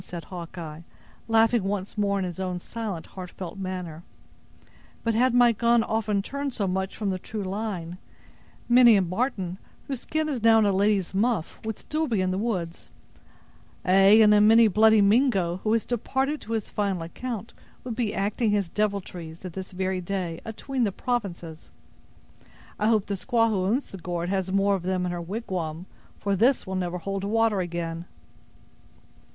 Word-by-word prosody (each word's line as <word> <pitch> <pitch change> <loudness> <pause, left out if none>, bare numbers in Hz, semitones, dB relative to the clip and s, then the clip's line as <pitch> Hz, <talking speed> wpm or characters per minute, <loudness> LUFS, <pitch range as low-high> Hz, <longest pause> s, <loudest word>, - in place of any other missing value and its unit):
said 170 -2 -7
Hawkeye, 170 -3 -8 0.5
laughing 225 -1 +3
once 195 0 -3
more 200 -2 +1
in 190 - -1
his 180 0 -6
own 185 -1 -2
silent, 205 -2 -5
heartfelt 185 0 -8
manner; 180 -4 -5 1.0
"but 230 - +1
had 250 +3 +3
my 245 -1 +6
gun 235 +1 +3
often 215 -3 0
turned 280 +3 -4
so 210 -4 -1
much 190 +1 -2
from 205 -3 -1
the 185 - -3
true 215 +2 -5
line, 185 -3 -4 0.7
many 240 -2 +7
a 195 - +4
marten, 185 -1 -2 0.3
whose 270 -3 -3
skin 310 +4 -2
is 270 -6 -2
now 225 0 +6
in 220 - +4
a 200 - +3
lady's 195 -1 +1
muff, 210 -3 0
would 220 -1 -4
still 310 +1 -2
be 225 -6 0
in 185 0 +1
the 185 - -1
woods; 185 -7 -3 1.0
ay, 195 +3 +6
and 210 - +6 0.2
many 225 +1 +7
a 215 - +2
bloody 220 +2 +5
Mingo, 200 -5 +3
who 215 +3 -2
has 230 - +1
departed 265 +5 -1
to 230 - -5
his 220 -2 -3
final 195 -5 -1
account, 225 +5 -6 0.3
would 245 -3 -5
be 230 -3 -1
acting 210 +3 0
his 205 -4 +1
deviltries 185 -5 -3
at 180 - -6
this 190 +1 -7
very 185 0 -2
day, 175 -2 -3
atween 250 +3 -3
the 205 - +1
provinces. 180 -9 -4 1.1
I 210 - +2
hope 220 -3 +3
the 200 - -3
squaw 230 +3 +1
who 190 -4 0
owns 240 +9 0
the 195 - -8
gourd 175 0 -3
has 190 -1 -1
more 195 +1 +3
of 195 - -1
them 180 0 -1
in 180 - -2
her 175 -1 -4
wigwam, 175 -4 -4 0.3
for 200 -1 -1
this 240 +7 +3
will 190 - -5
never 180 -1 -2
hold 195 +2 -4
water 220 0 +2
again!" 170 -1 -4
200 Hz, 180 wpm, -26 LUFS, 180-225 Hz, 1.1 s, many